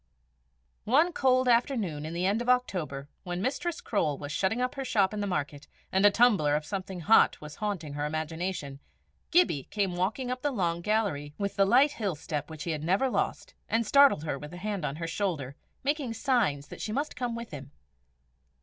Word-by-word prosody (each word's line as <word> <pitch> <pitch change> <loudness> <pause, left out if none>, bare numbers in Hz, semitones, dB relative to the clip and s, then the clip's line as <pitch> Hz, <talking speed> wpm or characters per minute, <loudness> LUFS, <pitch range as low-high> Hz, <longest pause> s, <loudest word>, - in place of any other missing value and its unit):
One 305 +10 +3
cold 255 -2 +3
afternoon 230 - +1
in 160 - -6
the 175 +2 0
end 205 +4 +1
of 240 - -2
October, 175 - 0
when 175 -1 -4
Mistress 285 - -2
Croale 155 -10 0
was 145 +1 -6
shutting 195 +9 0
up 250 0 0
her 275 -1 -4
shop 210 -6 +2
in 210 - -3
the 205 - -1
market, 145 -4 -3 0.2
and 190 +1 +2
a 205 - +9
tumbler 200 -10 +4
of 150 0 -2
something 190 0 -5
hot 220 +7 +5
was 150 0 -10
haunting 185 -9 -3
her 145 0 -3
imagination, 155 -2 -4 0.5
Gibbie 330 - +3
came 195 -4 -1
walking 220 +8 -1
up 255 0 -3
the 290 - +1
long 175 -9 -1
gallery 170 -9 -1
with 200 0 -2
the 200 -1 +4
light 260 +8 +5
hill 205 - -2
step 150 0 -4
which 155 -1 -7
he 165 -2 -1
never 190 - +1
lost, - - -2 0.2
and 225 +1 +1
startled 280 - +5
her 145 -3 -3
with 150 +4 -9
a - - -8
hand 200 -3 -3
on 140 - -3
her 165 +2 -4
shoulder, 165 -6 -2 0.3
making 280 -4 -1
signs 220 - +1
that - - -9
she 215 - -3
must 285 +7 -2
come 245 -2 -2
with 235 0 -7
him. 140 -3 -8
195 Hz, 200 wpm, -29 LUFS, 155-240 Hz, 0.5 s, a